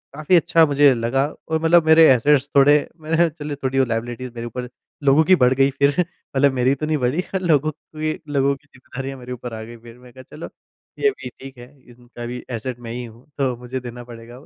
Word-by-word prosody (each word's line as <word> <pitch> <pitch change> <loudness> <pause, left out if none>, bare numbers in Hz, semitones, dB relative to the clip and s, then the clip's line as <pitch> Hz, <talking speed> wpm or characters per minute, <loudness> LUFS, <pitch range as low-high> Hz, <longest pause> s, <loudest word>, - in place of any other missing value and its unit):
काफ़ी 155 +5 +2
अच्छा 165 -1 +4
मुझे 145 -2 +4
लगा 120 +3 0 0.2
और 160 - 0
मतलब 165 0 +4
मेरे 160 0 +7
एसेट्स 140 +2 +3
थोडे 140 +1 +6 0.3
मैंने 160 +1 -1
ह - - +3
चलो 150 -2 -7
थोड़ी 135 0 +1
लायबिलिटीज़ 120 +2 -4
मेरे 115 0 -5
ऊपर 125 +1 -6 0.4
लोगों 140 +3 +5
की 185 +3 +6
बढ़ 125 -3 +3
गई 135 +1 +3
फिर। 140 0 +5
मतलब 140 -5 -1
मेरी 130 +1 +2
तो 155 +3 -4
नहीं 155 0 0
बढ़ी 130 +6 0
पर 190 - -1
लोगों 155 -4 +2
की 155 +1 -5 0.2
लोगों 140 0 +2
की 145 +2 -23
ज़िम्मेदारियाँ 135 0 -8
मेरे 125 0 -7
ऊपर 125 -1 -8
आ 110 - -6
गईं 115 +1 -11
फिर। 115 0 -13
मैंने 125 0 -16
कहा 130 +1 -13
चलो 160 - -8 0.5
ये 425 - +4
भी 125 - -9
ठीक 135 0 -11
है 120 0 -11 0.2
इनका 120 0 -11
भी 125 +1 -6
एसेट 120 +1 -5
मैं 115 -1 -8
ही 125 +1 -5
हूँ 115 +2 -15
तो 130 -3 0
मुझे 125 +2 -6
देना 120 -1 -9
पड़ेगा 120 0 -12
अब। 135 - -15
130 Hz, 230 wpm, -21 LUFS, 120-150 Hz, 0.5 s, मेरे